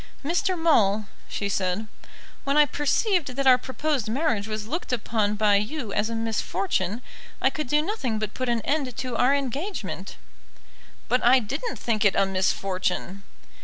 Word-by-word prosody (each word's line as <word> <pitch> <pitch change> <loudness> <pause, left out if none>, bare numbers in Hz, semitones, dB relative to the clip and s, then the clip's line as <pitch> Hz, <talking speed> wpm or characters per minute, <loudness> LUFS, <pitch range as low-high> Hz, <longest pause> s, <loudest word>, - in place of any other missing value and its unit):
"Mr. 360 +4 +1
Maule," 215 -11 +3 0.2
she 200 - -2
said, 195 +1 -1 0.6
"when 275 +1 +1
I 300 - +8
perceived 330 - +1
that 275 0 -1
our 255 -1 +7
proposed 260 -2 -2
marriage 230 -5 0
was 215 -1 -4
looked 310 +8 -4
upon 215 -3 0
by 210 -1 +4
you 220 +1 -3
as 210 +2 0
a 230 - -3
misfortune, 205 -1 -1 0.4
I 265 - +3
could 305 0 -4
do 295 +4 +2
nothing 310 - -2
but 215 -1 -3
put 255 -1 -2
an 235 -1 +1
end 275 -2 -1
to 255 -2 -3
our 265 +3 +4
engagement." 280 - -4 0.9
"But 250 - +1
I 245 +2 +7
didn't 275 - -3
think 225 -2 0
it 205 - +4
a 195 - +4
misfortune." 190 0 -1
240 Hz, 165 wpm, -25 LUFS, 210-290 Hz, 0.9 s, I